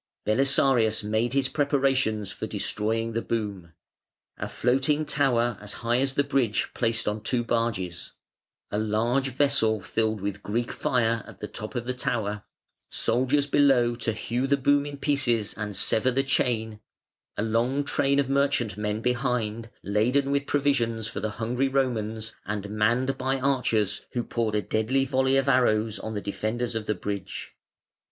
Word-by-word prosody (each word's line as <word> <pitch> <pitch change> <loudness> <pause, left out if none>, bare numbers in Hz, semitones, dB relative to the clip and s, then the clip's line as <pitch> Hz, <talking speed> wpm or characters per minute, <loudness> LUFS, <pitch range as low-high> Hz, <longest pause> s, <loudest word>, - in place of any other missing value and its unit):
Belisarius 120 -2 +3
made 110 +4 0
his 135 -1 +2
preparations 135 -8 +1
for - - -5
destroying 115 +2 -1
the 115 - 0
boom: 100 -8 -4 0.6
a - - -4
floating 135 +5 +1
tower 120 -7 +1
as 105 -1 -4
high 120 +1 +3
as 135 0 0
the 140 - +3
bridge 135 -6 +1
placed 115 -2 0
on 105 +1 -1
two 120 +2 0
barges, 105 -8 -2 0.6
a 105 - 0
large 115 +5 +1
vessel 130 -5 +2
filled 110 +2 -1
with 100 +1 -4
"Greek 115 +4 -2
fire" 115 -3 +1
at - - -13
the 105 - -5
top 110 +4 -8
of 120 -1 -2
the 125 - -1
tower, 105 -4 -2 0.5
soldiers 130 +5 +1
below 135 -4 +4
to 115 -1 -2
hew 120 +4 -2
the 140 0 +3
boom 145 +1 +2
in 145 -1 -7
pieces 130 -7 +1
and 105 -1 -5
sever 110 +5 +2
the 135 +2 +1
chain, 115 -5 0 0.6
a - - 0
long 120 +5 +1
train 140 -1 +1
of 140 -2 +2
merchantmen 110 -7 0
behind 120 -3 -1
laden 125 +8 +1
with 140 0 0
provisions 120 -6 +1
for 110 - -5
the 110 +1 -2
hungry 120 +4 0
Romans, 115 -5 -1
and 105 -1 -3
manned 120 +5 +1
by 135 +1 0
archers 125 -6 +1
who 120 - -1
poured 115 -3 -1
a 105 - +1
deadly 130 +5 +1
volley 130 0 +2
of 135 0 +1
arrows 110 -5 +2
on 110 +2 -5
the 100 - -2
defenders 115 +4 -2
of 110 -1 -4
the 105 - +1
bridge. 100 +1 -5
120 Hz, 160 wpm, -26 LUFS, 110-135 Hz, 0.6 s, below